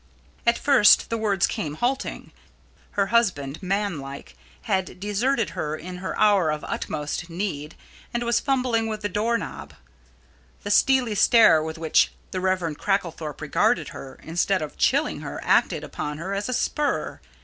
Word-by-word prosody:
At 235 Hz, -, +4 dB
first 270 Hz, -8 st, +5 dB
the 230 Hz, -, 0 dB
words 200 Hz, -4 st, +2 dB
came 150 Hz, -2 st, -3 dB
halting. 250 Hz, +9 st, -2 dB, 0.6 s
Her 200 Hz, -, +2 dB
husband, 160 Hz, -12 st, +1 dB
man 195 Hz, -3 st, -1 dB
like, 140 Hz, 0 st, -9 dB, 0.3 s
had 190 Hz, -5 st, -2 dB
deserted 220 Hz, +5 st, 0 dB
her 150 Hz, 0 st, -3 dB
in 180 Hz, +3 st, -8 dB
her 185 Hz, +1 st, -5 dB
hour 205 Hz, -6 st, +4 dB
of 150 Hz, 0 st, -2 dB
utmost 150 Hz, +2 st, -4 dB
need 165 Hz, -4 st, -4 dB, 0.4 s
and 240 Hz, 0 st, -2 dB
was 235 Hz, 0 st, +2 dB
fumbling 250 Hz, -5 st, 0 dB
with 215 Hz, -1 st, -4 dB
the 205 Hz, -, -2 dB
door 225 Hz, +4 st, +1 dB
knob. 195 Hz, -, -8 dB, 0.9 s
The 205 Hz, -, -3 dB
steely 255 Hz, 0 st, +3 dB
stare 210 Hz, -6 st, +6 dB
with 160 Hz, +1 st, -5 dB
which 160 Hz, -1 st, +3 dB, 0.2 s
the 185 Hz, -, -3 dB
Rev. 185 Hz, -4 st, 0 dB
Cracklethorpe 165 Hz, -7 st, -2 dB
regarded 215 Hz, +10 st, +1 dB
her, 135 Hz, -, -10 dB
instead 175 Hz, +2 st, 0 dB
of 150 Hz, -, -7 dB
chilling -, -, +1 dB
her, -, -, -6 dB
acted -, -, +2 dB
upon 150 Hz, 0 st, -5 dB
her 180 Hz, +5 st, -4 dB
as 200 Hz, +4 st, -2 dB
a -, -, -1 dB
spur. 295 Hz, +4 st, -1 dB
195 Hz, 160 wpm, -24 LUFS, 160-225 Hz, 0.9 s, stare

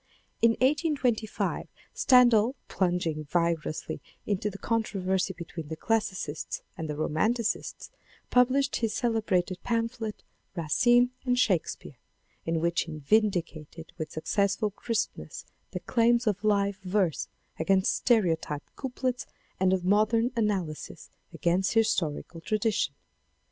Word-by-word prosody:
In 230 Hz, 0 st, +5 dB
1825 260 Hz, -6 st, 0 dB, 0.3 s
Stendhal 245 Hz, -1 st, +5 dB
plunging 175 Hz, -4 st, -1 dB
vigorously 165 Hz, -1 st, -1 dB, 0.2 s
into 205 Hz, 0 st, -1 dB
the 195 Hz, -, -9 dB
con 230 Hz, +2 st, 0 dB
troversy 190 Hz, -2 st, -1 dB
between 165 Hz, -2 st, -7 dB
the 160 Hz, -, -4 dB
Classicists 185 Hz, -7 st, -2 dB
and 160 Hz, -1 st, -5 dB
the 150 Hz, -, -2 dB
Romanticists, 215 Hz, +10 st, -1 dB, 0.4 s
published 255 Hz, +2 st, +3 dB
his 225 Hz, -2 st, -1 dB
celebrated 215 Hz, -8 st, 0 dB
pamphlet, 230 Hz, -2 st, -2 dB, 0.3 s
Racine 240 Hz, +10 st, +3 dB
and 250 Hz, -1 st, +1 dB
Shakes 200 Hz, -10 st, +2 dB
peare, 125 Hz, -, -14 dB, 0.5 s
in 165 Hz, 0 st, +1 dB
which 170 Hz, +1 st, +1 dB
he 160 Hz, -2 st, -6 dB
vindicated 165 Hz, -2 st, -1 dB
with 155 Hz, -1 st, -3 dB
successful 200 Hz, +6 st, 0 dB
crispness 225 Hz, +2 st, -3 dB, 0.2 s
the -, -, -5 dB
claims 235 Hz, +1 st, +2 dB
of 205 Hz, -1 st, 0 dB
live 200 Hz, -2 st, +2 dB
verse 185 Hz, -3 st, 0 dB, 0.3 s
against 195 Hz, -1 st, +2 dB
sterotyped 165 Hz, -, +1 dB
couplets 255 Hz, -2 st, -3 dB, 0.3 s
and 185 Hz, 0 st, +3 dB
of 185 Hz, -1 st, 0 dB
modern 215 Hz, +5 st, +3 dB
analysis 195 Hz, -9 st, -2 dB, 0.2 s
against 180 Hz, +2 st, +1 dB
historical 175 Hz, -7 st, 0 dB
tradition. 215 Hz, +2 st, 0 dB
200 Hz, 115 wpm, -28 LUFS, 170-230 Hz, 0.5 s, In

